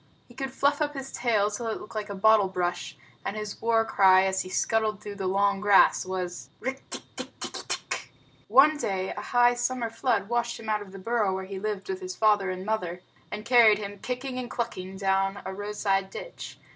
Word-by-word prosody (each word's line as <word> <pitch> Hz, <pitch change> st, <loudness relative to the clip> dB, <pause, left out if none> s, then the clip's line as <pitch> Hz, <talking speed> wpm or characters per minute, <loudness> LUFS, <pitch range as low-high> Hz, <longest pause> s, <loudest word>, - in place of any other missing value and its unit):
He 240 Hz, -, -16 dB
could 270 Hz, +2 st, -4 dB
fluff 280 Hz, +2 st, +1 dB
up 295 Hz, -1 st, 0 dB
his 270 Hz, 0 st, -6 dB
tail 215 Hz, -4 st, +1 dB
till 225 Hz, +3 st, -4 dB
it 220 Hz, -, -2 dB
looked 210 Hz, -, -11 dB
like 215 Hz, -1 st, -4 dB
a 200 Hz, -, -4 dB
bottle 215 Hz, 0 st, +5 dB
brush, 175 Hz, -1 st, -3 dB, 0.3 s
and -, -, -3 dB
his 210 Hz, -1 st, -6 dB
war 225 Hz, -1 st, +3 dB
cry 190 Hz, -2 st, +5 dB
as 190 Hz, 0 st, +1 dB
he 185 Hz, -, -7 dB
scuttled 215 Hz, +1 st, 0 dB
through 210 Hz, -1 st, -7 dB
the 195 Hz, -2 st, -3 dB
long 200 Hz, +1 st, +2 dB
grass 205 Hz, -2 st, +5 dB
was: 180 Hz, -1 st, -4 dB
"Rikk 265 Hz, +2 st, -3 dB
tikk -, -, -7 dB
tikki -, -, -7 dB
tikki -, -, -6 dB
tchk!" -, -, -4 dB, 0.4 s
One 300 Hz, +3 st, +6 dB
day, 190 Hz, -8 st, -2 dB
a -, -, -5 dB
high 245 Hz, 0 st, +4 dB
summer 240 Hz, -1 st, -2 dB
flood 230 Hz, -4 st, 0 dB
washed 235 Hz, +1 st, -1 dB
him 220 Hz, -, -7 dB
out 210 Hz, -1 st, +1 dB
of 200 Hz, -2 st, -10 dB
the 195 Hz, -, -9 dB
burrow 210 Hz, -1 st, 0 dB
where 190 Hz, 0 st, -4 dB
he 195 Hz, 0 st, -6 dB
lived 210 Hz, -1 st, -3 dB
with 380 Hz, 0 st, -4 dB
his 370 Hz, 0 st, -5 dB
father 205 Hz, -3 st, +3 dB
and 185 Hz, 0 st, -4 dB
mother, 180 Hz, -5 st, -2 dB, 0.3 s
and 210 Hz, +1 st, -6 dB
carried 230 Hz, -3 st, +6 dB
him, 205 Hz, -1 st, -7 dB
kicking 255 Hz, +2 st, -4 dB
and 245 Hz, -1 st, -5 dB
clucking, 190 Hz, -5 st, -4 dB
down 195 Hz, 0 st, +1 dB
a 190 Hz, -, -4 dB
roadside 200 Hz, -1 st, -1 dB
ditch. -, -, -8 dB
210 Hz, 215 wpm, -27 LUFS, 195-240 Hz, 0.4 s, One